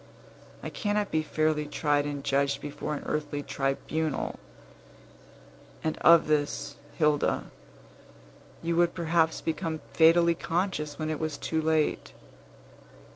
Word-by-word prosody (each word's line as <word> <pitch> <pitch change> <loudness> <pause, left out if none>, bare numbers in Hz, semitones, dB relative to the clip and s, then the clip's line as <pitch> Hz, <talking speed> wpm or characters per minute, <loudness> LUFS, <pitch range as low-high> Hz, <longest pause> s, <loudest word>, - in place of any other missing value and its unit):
I - - -5
cannot 205 -1 -1
be 155 - +2
fairly 155 -1 0
tried 145 -1 +1
and 145 -1 -4
judged 140 0 +1
before 150 +1 -4
an - - -6
earthly 145 -1 -2
tribunal; 140 +2 -2 1.4
and 155 - 0
of 170 -1 +7
this, 150 -1 -1 0.2
Hilda, 150 -2 +1 1.1
you 170 0 0
would 175 0 +3
perhaps 165 -1 +1
become 160 0 -3
fatally 170 +1 +5
conscious 165 -4 -2
when 155 0 -2
it 155 - -3
was 155 -2 -3
too 160 -1 -1
late. 160 -1 0
155 Hz, 120 wpm, -28 LUFS, 145-165 Hz, 1.4 s, of